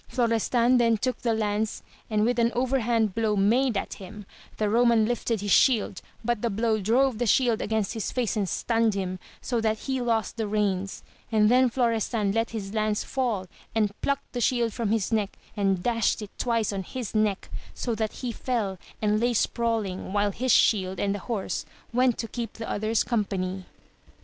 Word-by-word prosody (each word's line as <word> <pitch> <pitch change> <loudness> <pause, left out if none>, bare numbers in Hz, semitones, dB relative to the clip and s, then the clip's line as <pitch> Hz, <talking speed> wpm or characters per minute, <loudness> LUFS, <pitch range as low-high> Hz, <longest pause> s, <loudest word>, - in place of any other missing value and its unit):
Florestan 240 +1 +2
then 230 -1 +3
took 255 +4 -2
the 230 -2 +1
lance 215 0 -1 0.3
and 215 -1 +2
with 245 0 +1
an 235 0 +3
overhand 240 -4 +1
blow 220 -1 +1
made 225 +4 +3
at - - -3
him; 205 +2 -9 0.3
the 215 - 0
Eoman 230 0 +4
lifted 235 -3 -1
his 205 -1 -2
shield, 220 -7 +3 0.2
but 240 -2 0
the 235 - 0
blow 220 +1 +1
drove 240 +3 +2
the 240 - 0
shield 235 0 +3
against 220 -1 -1
his 225 -4 -3
face 245 -4 -1
and 200 -4 0
stunned 225 +2 +1
him, 185 -1 -3 0.2
so 240 -3 -1
that 220 -1 +1
he 265 -2 -2
lost 230 -1 0
the 220 -2 -1
reins, 200 -2 -1 0.3
and 215 -1 +4
then 255 0 +5
Florestan 230 -4 0
let 225 +2 0
his 205 -3 -5
lance 215 -1 0
fall, 235 -8 -1 0.3
and 210 -2 +2
plucked 280 0 -2
the 245 - -2
shield 235 -2 +1
from 230 -4 -2
his 220 -1 0
neck 210 -3 0 0.2
and 195 -3 +1
dashed 230 -2 +1
it 205 - -9
twice 230 -4 0
on 195 - -2
his 235 +3 -6
neck, 215 -3 0 0.2
so 240 - -2
that 220 -1 -1
he 240 - -1
fell, 220 -6 -2 0.2
and 210 0 +2
lay 240 +1 +1
sprawHng, 220 -6 -1
while 205 0 +2
his 255 +5 0
shield 190 -5 +3
and 200 0 0
horse 205 0 -3 0.3
went 250 0 +3
to 230 - -3
keep 230 -1 -5
the 225 - -7
others 215 +2 0
company. 190 -5 -2
220 Hz, 185 wpm, -26 LUFS, 205-235 Hz, 0.3 s, then